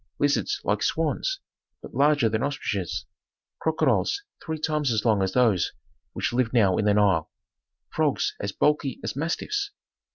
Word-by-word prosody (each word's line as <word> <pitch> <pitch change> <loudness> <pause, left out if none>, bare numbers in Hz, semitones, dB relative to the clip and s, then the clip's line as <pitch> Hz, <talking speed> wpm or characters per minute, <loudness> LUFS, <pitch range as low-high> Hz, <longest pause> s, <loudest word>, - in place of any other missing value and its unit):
Lizards 145 - +1
like - - 0
swans, - - 0 0.4
but - - -10
larger 145 -3 +4
than 110 0 0
ostriches, 105 - -2 0.5
crocodiles 160 - +1 0.2
three 160 -1 -3
times 150 -3 0
as 110 0 0
long 110 -4 +3
as 95 - 0
those 115 -8 +3 0.4
which - - -2
live 120 -1 +1
now 100 -7 +4
in 105 - +1
the 105 - +4
Nile, 95 -7 +3 0.6
frogs - - +1
as 100 - -3
bulky 145 +1 +1
as - - -3
mastiffs. 395 - -2
130 Hz, 150 wpm, -26 LUFS, 105-150 Hz, 0.6 s, larger